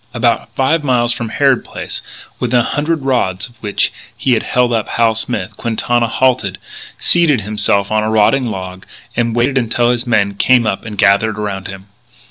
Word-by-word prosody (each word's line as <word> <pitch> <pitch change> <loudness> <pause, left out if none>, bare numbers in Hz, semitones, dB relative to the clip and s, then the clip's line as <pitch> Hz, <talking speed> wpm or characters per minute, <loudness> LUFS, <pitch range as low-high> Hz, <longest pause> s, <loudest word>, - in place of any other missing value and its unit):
About - - +1
five 150 +4 +1
miles 120 -3 +2
from 115 -2 -5
Harrod 135 +2 +2
Place, - - -7 0.4
within 125 0 +2
a - - 0
hundred 150 +3 -1
rods 120 -9 0
of 120 -1 -22
which 105 -2 0 0.2
he 130 - 0
had 115 - +2
held 125 -1 +1
up 110 -2 -1
Hal 115 -1 +2
Smith, 110 -4 -3
Quintana 120 +1 0
halted, 120 -6 +1 0.4
seated 160 -8 +3
himself 100 -1 0
on 110 0 +2
a 110 - -1
rotting 110 +4 +3
log, 95 -3 -6 0.3
and 115 -1 0
waited 130 +3 +2
until 120 0 +1
his 120 +1 -2
men 100 -4 +2
came 120 +4 +3
up 105 -1 -2
and 105 -2 -7
gathered 105 +2 +3
around 100 -3 -4
him. 95 -1 -9
115 Hz, 180 wpm, -16 LUFS, 105-125 Hz, 0.4 s, seated